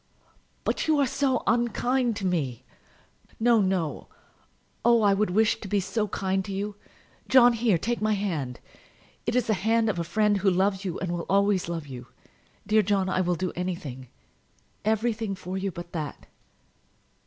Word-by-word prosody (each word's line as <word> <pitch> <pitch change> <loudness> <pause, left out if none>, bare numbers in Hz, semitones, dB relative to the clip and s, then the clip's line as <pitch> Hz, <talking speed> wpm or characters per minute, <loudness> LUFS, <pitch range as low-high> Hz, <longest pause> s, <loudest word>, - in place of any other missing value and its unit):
"But - - -1
you 310 -1 +3
are 280 - +4
so 265 0 0
unkind 240 +2 +1
to 205 -2 -4
me!" 135 -9 -1 0.8
"No, 230 -1 +4
no; 185 -6 -1 0.8
oh, 235 -1 +5
I 200 -1 +5
would 210 +1 +1
wish 215 +4 +2
to 205 - -6
be 205 +1 +1
so 210 +3 -1
kind 190 0 -1
to 200 - -7
you! 200 +1 -3 0.5
John, 245 -2 +7
here; 225 -5 +2
take 235 +8 -2
my 215 0 +2
hand. 160 - -3 0.7
It 235 - 0
is 250 -2 +2
the 220 - +1
hand 220 +3 +1
of 175 - -5
a - - 0
friend 210 +4 +2
who 195 +1 +3
loves 190 +2 +1
you, 185 -4 -3
and 185 - -3
will 175 -1 -4
always 200 -2 +2
love 165 -3 -4
you. 125 -3 -9 0.6
Dear 215 +1 +4
John, 195 -2 +1
I 185 - +1
will 180 -1 +1
do 185 +1 -3
anything, 170 -8 -5 0.8
everything 220 -1 0
for 185 0 -6
you 195 +1 -1
but 175 0 -9
that." 155 -4 -5
200 Hz, 175 wpm, -26 LUFS, 180-220 Hz, 0.8 s, John